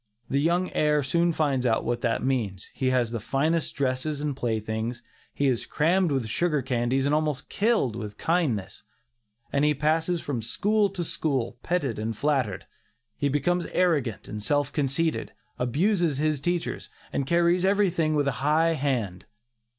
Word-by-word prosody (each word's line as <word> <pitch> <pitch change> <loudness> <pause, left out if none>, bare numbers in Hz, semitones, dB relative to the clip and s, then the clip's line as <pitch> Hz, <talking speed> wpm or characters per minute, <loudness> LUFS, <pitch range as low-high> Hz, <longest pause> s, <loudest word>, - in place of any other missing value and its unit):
The 140 +1 +2
young 175 +4 +1
heir 150 -1 +2
soon 170 +6 +2
finds 145 -5 0
out 115 -3 +1
what 120 0 -1
that 115 -3 0
means; 110 -8 -2
he 130 - 0
has 125 -3 +1
the 115 - -2
finest 155 +8 0
dresses 140 +2 -1
and 145 -2 -2
playthings; 115 0 -2 0.3
he 140 - -1
is 130 -4 +1
crammed 175 +2 +2
with 135 -4 0
sugar 150 +4 0
candies 130 +1 0
and 145 - +2
almost 150 -3 0
"killed 205 - +1
with 105 -3 -6
kindness," 125 - -1 0.7
and 140 - +2
he 150 0 +3
passes 160 +4 +1
from 140 -7 -3
school 205 - +1
to 185 -2 -4
school, 140 -8 -1
petted 145 -11 -1
and 110 0 -3
flattered. 135 -9 0 0.5
He 145 - 0
becomes 175 +5 0
arrogant 150 - 0
and 105 0 -6
self 145 +5 0
conceited, 150 +3 0 0.3
abuses 165 - +1
his 150 -1 0
teachers, 175 +2 -2 0.2
and 135 - -1
carries 170 +2 +3
everything 185 -6 +2
with 145 -1 +1
a - - +3
high 160 +3 +3
hand. 120 - -2
145 Hz, 160 wpm, -26 LUFS, 125-165 Hz, 0.7 s, he